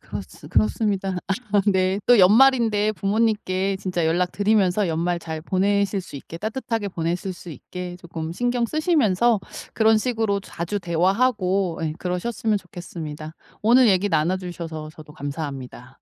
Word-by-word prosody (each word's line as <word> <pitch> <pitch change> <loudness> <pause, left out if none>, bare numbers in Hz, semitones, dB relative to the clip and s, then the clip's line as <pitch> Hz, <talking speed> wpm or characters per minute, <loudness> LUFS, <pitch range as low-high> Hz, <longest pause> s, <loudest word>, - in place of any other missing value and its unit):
그렇 100 +3 -6 0.3
그렇습니다. 190 - 0 0.4
아 205 - +5
네 190 0 +2
또 245 -2 +6
연말인데 220 0 +5
부모님께 195 -2 0
진짜 180 -3 -1
연락 175 +2 +1
드리면서 205 -1 +2
연말 170 +2 0
잘 160 -2 -6
보내실 200 +3 +1
수 175 - -13
있게 165 +4 -9
따뜻하게 225 0 -3
보내실 175 +2 -2
수 175 -1 -11
있게 180 +5 -7
쪼끔 165 -2 -6
신경 245 +4 0
쓰시면서 240 - +2 0.3
그런 220 -1 +4
식으로 220 -4 0
자주 190 +1 -4
대화하고 185 0 +1
예 155 -1 -1
그러셨으면 210 +4 -1
좋겠습니다. 160 -4 -8 0.3
오늘 240 +2 +6
얘기 195 +1 +3
나눠주셔서 170 -3 -2
저도 150 -1 -13
감사합니다. 140 -4 -6
185 Hz, 340 characters per minute, -23 LUFS, 170-215 Hz, 0.4 s, 또